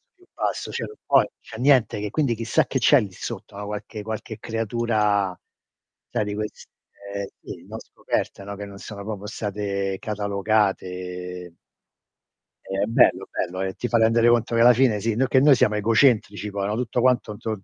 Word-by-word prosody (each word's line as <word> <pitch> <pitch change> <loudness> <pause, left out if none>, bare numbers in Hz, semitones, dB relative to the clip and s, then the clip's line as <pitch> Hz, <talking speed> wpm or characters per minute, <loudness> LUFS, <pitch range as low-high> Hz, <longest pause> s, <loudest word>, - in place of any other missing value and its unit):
più 365 -1 -24
basso, - - -2
cioè - - -3
non 430 - -11
puoi - - +5
non - - -4
c'è 110 - -11
niente 125 -5 +3
che 105 0 -3
quindi 135 0 0
chissà 115 0 +1
che 130 - -1
c'è 130 +3 +6
lì 100 -3 -5
sotto, 100 +1 -7
no, 105 - -5
qualche 105 +1 -6
qualche 110 0 -5
creatura 110 -4 0 0.7
sai 105 - -1
di 105 0 -3
queste 105 0 -5 0.8
sì, - - -9
non - - -7
scoperte, 100 - -4
no, 100 +1 -6
che 100 +1 -6
non 100 0 -11
sono 100 0 -8
proprio 105 -1 -6
state 100 -2 -3
catalogate. 95 -4 -2 1.1
È 95 +1 -1
bello 115 - +3
bello, 95 +2 -3
e 95 0 -2
ti 120 - -3
fa 120 - +2
rendere 115 +1 +4
conto 120 0 +2
che 115 - +3
alla 120 +1 +8
fine 120 -4 +3
sì, 115 +1 -1
noi 130 +3 +2
che 130 - +4
noi 140 +1 +6
siamo 105 -3 +2
egocentrici 105 -1 +2
poi, 100 0 -2
no, 105 - -1
tutto 120 +1 -1
quanto 125 -3 +2
intorno 105 -1 -5
105 Hz, 185 wpm, -24 LUFS, 100-115 Hz, 1.1 s, alla